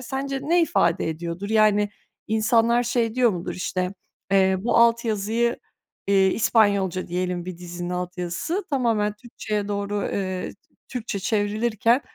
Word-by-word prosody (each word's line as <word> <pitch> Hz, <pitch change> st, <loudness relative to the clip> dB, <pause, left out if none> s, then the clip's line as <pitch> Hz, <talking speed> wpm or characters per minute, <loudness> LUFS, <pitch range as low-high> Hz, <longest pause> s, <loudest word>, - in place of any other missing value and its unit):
sence 270 Hz, +2 st, -3 dB
ne 335 Hz, +4 st, +3 dB
ifade 325 Hz, -, +1 dB
ediyordur? 170 Hz, +4 st, -4 dB
Yani, 210 Hz, -1 st, +3 dB, 0.4 s
insanlar, 230 Hz, +2 st, +3 dB
şey, 235 Hz, -2 st, 0 dB
diyor 250 Hz, -2 st, +4 dB
mudur? 175 Hz, -3 st, -4 dB
İşte, 185 Hz, +1 st, -2 dB, 0.4 s
eee, 190 Hz, -1 st, +4 dB
bu 230 Hz, -, +1 dB
alt 235 Hz, 0 st, +4 dB
yazıyı 225 Hz, +2 st, 0 dB, 0.5 s
eee, 195 Hz, -1 st, +4 dB
İspanyolca 200 Hz, -5 st, +2 dB
diyelim 180 Hz, 0 st, -2 dB
bir 180 Hz, -1 st, -7 dB
dizinin 175 Hz, 0 st, -6 dB
alt 180 Hz, 0 st, -4 dB
yazısı 180 Hz, -, -2 dB
tamamen 230 Hz, -6 st, +1 dB
Türkçeye 210 Hz, -2 st, -4 dB
doğru, 205 Hz, 0 st, -2 dB
eee, 185 Hz, -2 st, -3 dB, 0.4 s
Türkçe 235 Hz, -5 st, -4 dB
çevrilirken, 215 Hz, +4 st, +1 dB
210 Hz, 135 wpm, -24 LUFS, 185-235 Hz, 0.5 s, diyor